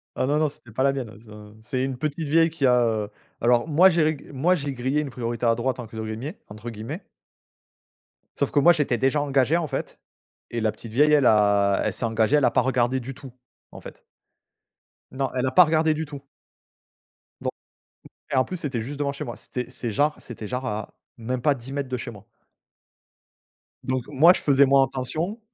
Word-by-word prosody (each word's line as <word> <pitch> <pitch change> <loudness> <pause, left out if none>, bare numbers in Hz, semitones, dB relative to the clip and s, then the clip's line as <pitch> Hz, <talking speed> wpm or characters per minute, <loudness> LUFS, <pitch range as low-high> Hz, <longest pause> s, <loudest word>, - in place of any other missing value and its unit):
Ah - - 0
non, 145 +3 +1
non, 155 - +3
c'était 120 -5 -16
pas 130 +5 -1
la 140 - +4
mienne, 125 -5 -5
ah - - -14
ça. 105 -1 -13
C'est 130 +3 -2
une 130 -2 -3
petite 155 +3 -3
vieille 165 +3 +4
qui 155 -3 -1
a, 125 -1 +4
heu 110 -3 -1 0.3
alors 120 +4 +3
moi 170 +5 +6
j'ai 170 -3 +2
reg 155 -2 -2
moi 170 +8 +2
j'ai 140 -3 -4
grillé 130 +4 -1
une 145 - -5
«priorité 120 0 -3
à 115 0 +4
droite» 130 +2 -2
entre 115 -2 -8
guillemets 110 - -5
entre 105 +3 -8
guillemets. 115 - -7 1.3
Sauf - - 0
que 145 - +3
moi 175 +4 +6
j'étais 145 -6 0
déjà 135 +2 +1
engagé, 140 +3 +2
en 165 -3 -2
fait, - - -5 0.5
et 120 -1 -2
la 110 -1 +1
petite 115 - -11
vieille 150 +4 +4
elle 145 -3 +4
a 100 -2 +4
elle - - 0
s'est 120 - -1
engagée, 115 +4 +2
elle 145 - +3
a - - +3
pas - - +3
regardé 130 0 +1
du 130 +3 -7
tout, 135 -2 -12 0.4
en - - -11
fait. - - -12 1.1
Non 135 0 -2
elle 125 +1 0
a 130 - 0
pas 180 - +8
regardé 160 -1 +2
du 160 +1 -3
tout 140 -2 -9 1.2
Don - - -1 0.6
E 145 - -14
et - - +2
en 130 - +4
plus 185 - -5
c'était 130 -8 -3
juste 140 +5 -6
devant 140 -1 0
chez 140 - -6
moi. 120 - -6
C'était 125 -1 -6
c'est 120 - -4
genre 150 +8 +1
c'était 110 -3 -8
genre 125 +3 -4
à, 110 -3 -4 0.2
même 125 +2 -3
pas 140 +3 +3
10 125 +2 -10
mètres 140 -2 -3
de 125 - -2
chez 120 0 -6
moi. 105 -2 -14 1.6
Donc 130 -1 -2
moi 155 +6 +6
je - - -5
faisais 140 -1 +5
moins 135 0 +5
attention. 155 - -3
130 Hz, 215 wpm, -24 LUFS, 120-145 Hz, 1.6 s, pas